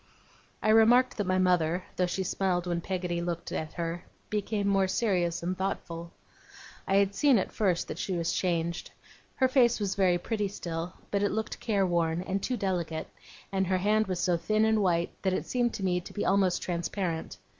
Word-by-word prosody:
I 215 - +2
remarked 235 +4 +5
that 205 -3 -1
my 185 0 +2
mother, 180 -1 +2
though 180 - +1
she 190 +2 -2
smiled 180 -1 0
when 175 -1 -1
Peggotty 180 -1 -2
looked 170 -1 -4
at 155 -1 -4
her, 170 0 -3 0.3
became 210 -1 -1
more 195 -1 +3
serious 180 -5 0
and 180 +2 -1
thoughtful. 170 -3 -4 0.8
I 195 - +2
had 200 0 +3
seen 265 +4 +4
at 190 - -1
first 185 -5 0
that 155 - -6
she 190 - -2
was 170 -2 0
changed. 170 -2 -1 0.5
Her 260 - +3
face 250 -3 +3
was 200 -2 -1
very 185 -3 +3
pretty 210 +3 -2
still, 170 -2 -5 0.2
but 200 - +1
it 205 - +2
looked 220 -1 -3
careworn, 175 -6 +1
and 195 +1 -2
too 250 +3 -1
delicate; 175 -5 -2 0.4
and 190 -1 0
her 185 0 +2
hand 215 +3 +2
was 185 -2 -2
so 175 -1 +2
thin 215 +5 +1
and 220 -1 +3
white 175 -3 +1
that 190 -1 +1
it - - -1
seemed 240 -2 0
to 205 - -5
me 180 -1 +1
to - - -11
be 205 - -2
almost 190 -2 +2
transparent. 170 -1 -3
185 Hz, 195 wpm, -29 LUFS, 175-205 Hz, 0.8 s, remarked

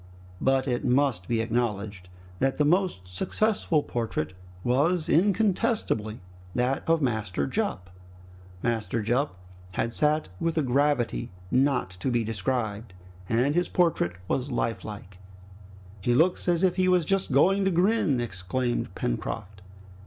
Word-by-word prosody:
But 135 0 +2
it 120 -2 -1
must 125 -7 +1
be 115 -1 +1
acknowledged 105 -5 -2 0.3
that 135 0 +1
the 150 - +3
most 180 - +2
successful 160 - 0
portrait 110 -9 -3 0.3
was 155 +7 +2
incontestably 195 - +1 0.3
that 125 +2 +1
of 165 -2 +3
Master 110 -7 -1
Jup. 135 - -2 0.7
Master 115 -2 -1
Jup 120 -1 0 0.4
had 115 +5 -1
sat 150 +3 +1
with 165 0 -1
a 155 - +3
gravity 130 - +1 0.2
not 130 -6 +2
to 130 - -1
be 120 -2 +1
described, 110 -1 -2 0.4
and 125 +5 +2
his 175 +2 +1
portrait 165 - +2
was 130 +6 -1
lifelike! 105 -5 -4 0.8
"He 120 +5 +2
looks 175 +7 +2
as 175 0 +2
if 185 -1 +3
he 185 0 +3
was 180 -3 +3
just 195 -3 0
going 190 +9 +4
to - - +4
grin!" 180 - +2
exclaimed 120 +3 -2
Pencroft. 95 +10 -4
125 Hz, 130 wpm, -27 LUFS, 110-165 Hz, 0.8 s, going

